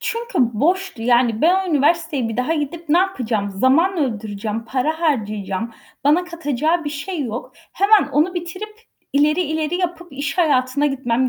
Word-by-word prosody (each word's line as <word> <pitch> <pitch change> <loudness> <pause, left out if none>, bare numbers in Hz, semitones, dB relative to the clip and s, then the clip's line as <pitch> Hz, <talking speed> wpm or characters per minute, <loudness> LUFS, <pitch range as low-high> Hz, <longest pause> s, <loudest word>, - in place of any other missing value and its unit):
Çünkü 470 +1 -3 0.2
boştu. 355 - 0
Yani 240 -1 +3
ben 375 +3 +3
o 360 - -3
üniversiteye 295 -3 +1
bir 225 - -4
daha 255 +7 0
gidip 320 +2 -4
ne 330 +4 +4
yapacağım? 235 - -1
Zaman 270 - +3
öldüreceğim, 220 -3 -3
para 275 +7 -1
harcayacağım. 215 - -1 0.3
Bana 315 +5 +4
katacağı 325 -1 -1
bir 290 - -2
şey 305 +3 -4
yok. 240 -1 -5 0.2
Hemen 400 -6 +4
onu 320 +6 +2
bitirip, 355 +5 -5 0.4
ileri, 300 +4 +3
ileri 315 +1 -2
yapıp 350 -3 -4
iş 285 +6 -4
hayatına 280 -3 +2
gitmem 260 -2 0
295 Hz, 155 wpm, -20 LUFS, 245-345 Hz, 0.4 s, ne